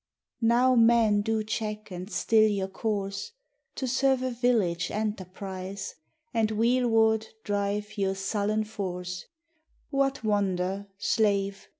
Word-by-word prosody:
Now 240 +3 +4
men 230 -3 +5
do 220 +1 0
check 215 -1 -4
and 180 +2 -6
still 220 -1 +4
your 195 -2 -1
course 200 - -3 0.4
To 260 - -2
serve 265 0 +2
a 255 - -1
village 230 -9 +1
enterprise, 195 -2 -4 0.4
And 225 -2 +2
wheelward 225 -1 +3 0.2
drive 205 +1 -2
your 195 -1 +1
sullen 205 +2 0
force, 185 -4 -5 0.7
What 275 -2 +1
wonder, 200 -2 0
slave! 200 -2 +1
210 Hz, 110 wpm, -28 LUFS, 195-225 Hz, 0.7 s, men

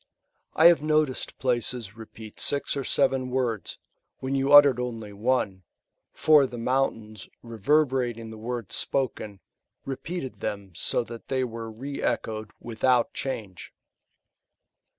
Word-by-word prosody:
I 160 - +4
have 170 -2 +8
noticed 155 -3 0
places 120 -4 -2
repeat 110 -1 -11
sii 140 0 -1
or 140 - -2
seven 130 -1 +1
words, 125 -5 -2 0.4
when 130 +1 -4
you 135 +1 +1
uttered 145 -4 +8
only 115 -4 -5
one; 100 -3 0 0.5
for 150 -3 +5
the 125 - -8
moun 130 +3 +1
tains, 110 -2 -12
reverberating 120 -1 0
the 110 - -9
words 120 -1 -5
spoken, 110 -7 -2 0.4
repeated 135 +1 -5
them 100 -3 -5
so 95 - 0
that 115 0 -10
they 130 -1 0
were 115 -2 -5
re 135 +6 -6
echoed 110 -1 -2
' - - -44
without 120 +1 +2
change. 105 -9 -5
125 Hz, 130 wpm, -26 LUFS, 110-135 Hz, 0.5 s, have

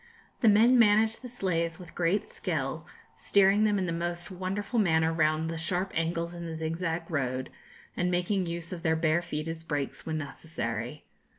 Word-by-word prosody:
The 225 - +5
men 230 +5 +6
manage 220 0 +5
the 255 - -9
sleighs 170 -8 -1
with 175 -2 -12
great 175 +4 +1
skill, - - -3 0.3
steering 200 +1 +4
them 210 -1 +2
in 190 - 0
the 175 - -2
most 175 +2 -3
wonderful 195 +5 -2
manner 160 -4 +3
round 155 0 +2
the 165 0 -3
sharp 180 +3 -1
angles 165 +1 -1
in 170 -1 -6
the 160 -1 -5
zigzag 165 +1 -2
road, 130 -4 -2 0.4
and 175 0 0
making 180 +1 0
use 170 +1 -4
of 175 - -6
their 160 -2 +2
bare 160 +1 +2
feet 160 -2 -4
as 165 0 -5
brakes 145 -4 -3
when 160 -1 -2
necessary. 140 -4 -5
170 Hz, 180 wpm, -29 LUFS, 160-190 Hz, 0.4 s, men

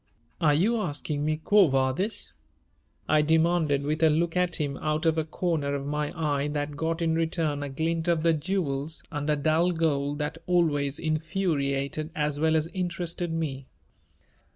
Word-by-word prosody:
"Are 150 -3 +4
you 215 +10 +2
asking 150 -6 -2
me 155 +1 0
quo 200 +4 +5
vadis?" 135 +10 -1 0.7
I 155 -1 +4
demanded, 160 -2 +2
with 155 +2 -1
a 160 - +6
look 165 +3 +1
at 180 -1 +1
him 145 -4 -2
out 155 +1 -1
of 160 -1 +3
a 160 - +1
corner 155 -3 -1
of 140 -1 -4
my 150 0 -2
eye 145 -2 0
that 145 0 -3
got 165 +2 -1
in 165 -1 +2
return 160 -3 0
a 145 - -4
glint 160 +4 -1
of 170 -2 +2
the 165 -1 +4
jewels 155 -2 -2
under 150 0 0
dull 155 +4 +2
gold 145 -3 0
that 150 +2 -3
always 150 -6 +1
infuriated 155 -3 -1
as 150 -1 -1
well 160 +1 +3
as 155 -1 +2
interested 175 -1 -3
me. 140 -5 -3
155 Hz, 165 wpm, -27 LUFS, 145-165 Hz, 0.7 s, a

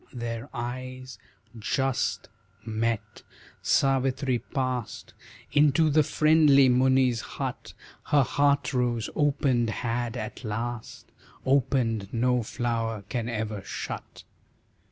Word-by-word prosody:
Their 120 +1 -5
eyes 130 +1 -6 0.4
just 135 +4 -1 0.4
met, 115 0 -2 0.4
Savitri 135 -1 +2
past 130 -4 -4 0.4
Into 150 +1 +4
the 155 +2 +5
friendly 150 -2 +5
Muni's 130 -1 +3
hut, - - -6 0.3
Her 145 -2 +4
heart 140 +3 +1
rose 120 -3 0
opened 135 -5 +2
had 120 +2 -2
at 110 +3 -6
last 115 +1 -5 0.4
Opened 120 -6 +1
no 125 +1 +2
flower 115 -2 -2
can 120 -2 -2
ever 110 -3 -3
shut. - - -7
125 Hz, 95 wpm, -27 LUFS, 115-135 Hz, 0.4 s, the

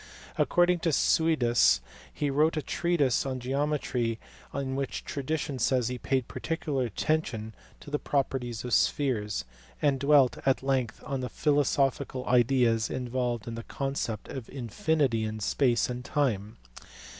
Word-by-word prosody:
According 175 0 +3
to 165 - 0
Suidas 120 - +3 0.3
he 145 -2 -1
wrote 155 +3 +2
a 155 - -1
treatise 155 -7 +1
on 130 -1 -3
geometry 130 -3 -1 0.3
in 135 -1 -3
which 135 -1 -3
tradition 140 -1 -3
says 125 0 +2
he 125 0 -4
paid 130 -1 0
particular 150 -5 -2
attention 115 -2 -1 0.3
to 145 - -11
the 150 - 0
properties 130 -5 -1
of 125 - -3
spheres, 110 - +1 0.3
and 140 -3 +2
dwelt 140 -2 +4
at 135 0 +2
length 130 -4 -1
on 135 -1 -2
the 125 - -3
philo 145 -1 +2
sophical 135 -2 0
ideas 120 -2 +3
involved 125 -2 -2
in 115 - -4
the 115 - -5
conception 135 -3 -4
of 130 -4 -7
infinity 130 0 0
in 110 0 -3
space 120 +3 +2
and 125 0 -5
time. 110 -8 -1
130 Hz, 145 wpm, -28 LUFS, 120-145 Hz, 0.3 s, dwelt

